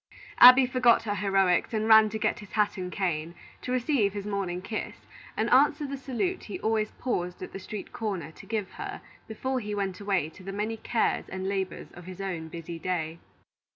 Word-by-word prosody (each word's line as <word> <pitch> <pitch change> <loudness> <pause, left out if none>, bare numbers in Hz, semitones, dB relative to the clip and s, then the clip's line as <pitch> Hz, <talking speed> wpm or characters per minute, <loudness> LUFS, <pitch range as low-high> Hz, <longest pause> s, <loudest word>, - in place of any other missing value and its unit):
Abby 255 +1 +10
forgot 250 -2 +4
her 210 -2 -1
heroics 195 0 +2
and 215 0 0
ran 220 -1 +7
to 220 - -3
get 215 0 0
his 205 -2 -12
hat 210 -1 +2
and 180 -2 -5
cane, 170 -3 -2 0.3
to 250 - -5
receive 250 -5 +1
his 205 -1 -5
morning 195 -4 -2
kiss, 215 +4 -6 0.3
and 220 - +1
answer 290 +3 +4
the 280 0 -4
salute 275 +8 -3
he 365 - -6
always 220 -1 +1
paused 180 -8 -3
at - - -7
the - - -6
street 200 +1 -8
corner 190 -9 -3
to - - -14
give 215 -4 -3
her 400 0 -6 0.2
before 260 +4 -2
he 210 -3 -4
went 195 -2 -2
away 195 -6 0
to 175 - -15
the 195 +1 -6
many 210 +3 -3
cares 225 +1 0
and 190 0 -4
labors 190 -2 -3
of 175 - -12
his 185 0 -9
own 180 -5 -4
busy 165 +1 -7
day. 165 -2 -3
205 Hz, 200 wpm, -28 LUFS, 185-225 Hz, 0.3 s, Abby